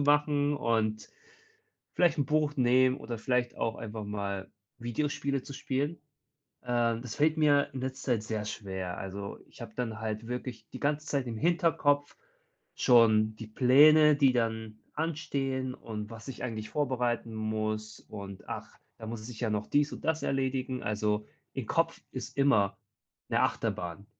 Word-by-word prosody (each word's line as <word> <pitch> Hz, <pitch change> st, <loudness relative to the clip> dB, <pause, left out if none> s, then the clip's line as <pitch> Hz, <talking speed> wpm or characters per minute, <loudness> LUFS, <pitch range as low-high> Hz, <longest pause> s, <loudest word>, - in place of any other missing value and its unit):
machen 145 Hz, 0 st, +3 dB
und 110 Hz, -5 st, 0 dB, 0.9 s
vielleicht 170 Hz, -3 st, +3 dB
'n 140 Hz, -, +2 dB
Buch 150 Hz, 0 st, +1 dB
nehmen 130 Hz, +1 st, +4 dB
oder 120 Hz, -, -5 dB
vielleicht 125 Hz, +1 st, 0 dB
auch 115 Hz, 0 st, -1 dB
einfach 110 Hz, -1 st, -6 dB
mal 100 Hz, -2 st, -4 dB, 0.3 s
Videospiele 140 Hz, +2 st, -1 dB
zu 140 Hz, -, -9 dB
spielen. 140 Hz, +3 st, -1 dB, 0.7 s
Äh, 120 Hz, -2 st, +1 dB
das 125 Hz, -3 st, -6 dB
fällt 155 Hz, +2 st, +3 dB
mir 145 Hz, -2 st, +4 dB
in 130 Hz, -, -4 dB
letzter 130 Hz, -1 st, -1 dB
Zeit 110 Hz, -2 st, -1 dB
sehr 110 Hz, -1 st, -3 dB
schwer. 95 Hz, -4 st, -4 dB
Also, 100 Hz, +1 st, -5 dB
ich -, -, -15 dB
habe 110 Hz, -2 st, -8 dB
dann 115 Hz, -3 st, -3 dB
halt 110 Hz, 0 st, -3 dB
wirklich 125 Hz, -3 st, -5 dB
die -, -, -7 dB
ganze 150 Hz, +1 st, 0 dB
Zeit 135 Hz, -3 st, 0 dB
im 115 Hz, -2 st, -4 dB
Hinterkopf 155 Hz, -3 st, +2 dB, 0.6 s
schon 110 Hz, -3 st, +5 dB
die 115 Hz, -, -6 dB
Pläne, 150 Hz, +6 st, +7 dB
die 135 Hz, -3 st, +4 dB
dann 110 Hz, -2 st, -1 dB, 0.2 s
anstehen 135 Hz, -5 st, -2 dB
und 105 Hz, -2 st, -6 dB
was 115 Hz, +1 st, -10 dB
ich 130 Hz, -, -7 dB
eigentlich 110 Hz, -3 st, -4 dB
vorbereiten 125 Hz, -5 st, 0 dB
muss. 110 Hz, 0 st, -2 dB
Und 100 Hz, -2 st, -9 dB
ach, -, -, -6 dB, 0.2 s
da 110 Hz, -, -8 dB
muss 115 Hz, -1 st, -5 dB
es 110 Hz, -, -8 dB
ich 115 Hz, -, -9 dB
ja 115 Hz, -, +1 dB
noch 105 Hz, 0 st, -1 dB
dies 145 Hz, 0 st, +2 dB
und -, -, -9 dB
das 160 Hz, 0 st, +1 dB
erledigen. 130 Hz, -1 st, -1 dB
Also, 105 Hz, 0 st, 0 dB, 0.3 s
im -, -, -4 dB
Kopf -, -, +1 dB
ist -, -, -7 dB
immer 110 Hz, -9 st, +3 dB, 0.5 s
'ne -, -, +2 dB
Achterbahn. 90 Hz, +3 st, -1 dB
120 Hz, 160 wpm, -30 LUFS, 110-140 Hz, 0.9 s, Pläne